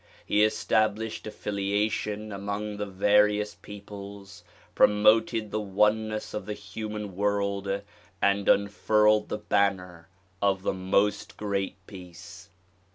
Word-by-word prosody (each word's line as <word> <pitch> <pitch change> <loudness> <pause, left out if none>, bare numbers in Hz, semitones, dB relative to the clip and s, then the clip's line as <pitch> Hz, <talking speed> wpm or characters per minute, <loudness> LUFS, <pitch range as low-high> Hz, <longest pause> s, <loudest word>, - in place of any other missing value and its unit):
He 105 - +3
established 110 0 0
affiliation 105 +1 -2
among 100 +1 -4
the 105 0 -3
various 105 +2 +2
peoples, 100 -2 -11 0.3
promoted 110 +1 +3
the 110 - -1
oneness 105 +2 0
of 105 -2 -5
the 105 - -3
human 105 -1 -6
world 100 0 -1 0.4
and 100 0 +2
unfurled 105 +1 +3
the - - -2
banner 95 -5 -1 0.3
of 95 -2 +1
the - - 0
"Most 100 +2 0
Great 100 -2 -2
Peace." 90 -2 -12
100 Hz, 105 wpm, -27 LUFS, 100-105 Hz, 0.4 s, He